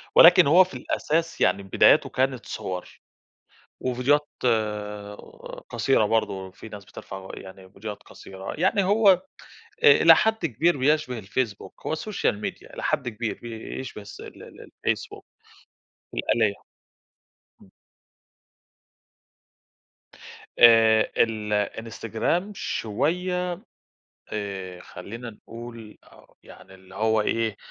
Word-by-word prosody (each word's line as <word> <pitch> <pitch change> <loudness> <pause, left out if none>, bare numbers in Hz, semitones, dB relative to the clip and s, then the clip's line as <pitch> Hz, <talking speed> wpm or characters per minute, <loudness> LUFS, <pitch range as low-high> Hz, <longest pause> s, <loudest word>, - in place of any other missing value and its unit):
ولكن - - +8
هو 175 +5 +7
في 185 - -12
الأساس 165 +2 -2
يعني 100 +2 +2
بداياته 95 - +4
كانت 130 -1 -1
صور 90 -1 -6 0.8
وفيديوهات 130 +4 +1 1.4
قصيرة 135 -5 +2
برضه، 100 -4 -1
في 105 +4 -12
ناس 100 -2 -10
بترفع 95 -1 -10
يعني 95 0 -12
فيديوهات 105 +1 -8
قصيرة، 95 0 -9
يعني 190 +2 +2
هو 205 +2 +4
آآ، 185 - +3 0.8
إلى - - +9
حد 220 -5 +1
كبير 160 +5 +1
بيشبه 140 -3 +1
الفيسبوك، 105 +1 -4
هو 160 - 0
Social 210 - -1
Media - - -7
إلى - - -7
حد 125 - 0
كبير 110 0 -4
بيشبه 115 0 -7
الس 100 0 -12
ال - - -11
ال - - -13 0.2
الفيسبوك، - - -2 0.9
الآلية، 110 -3 +1 1.1
امم. - - -18 2.9
آآ 115 -2 +6
الإنستجرام 115 - -1
شوية 180 - -1 0.8
آآ 95 -4 -5
خلينا 115 +8 -9
نقول 115 0 -11
أو - - -21
يعني 95 - -15
اللي 95 0 -17
هو 110 +1 +2
إيه، 110 -1 -1
115 Hz, 105 wpm, -25 LUFS, 100-145 Hz, 2.9 s, إلى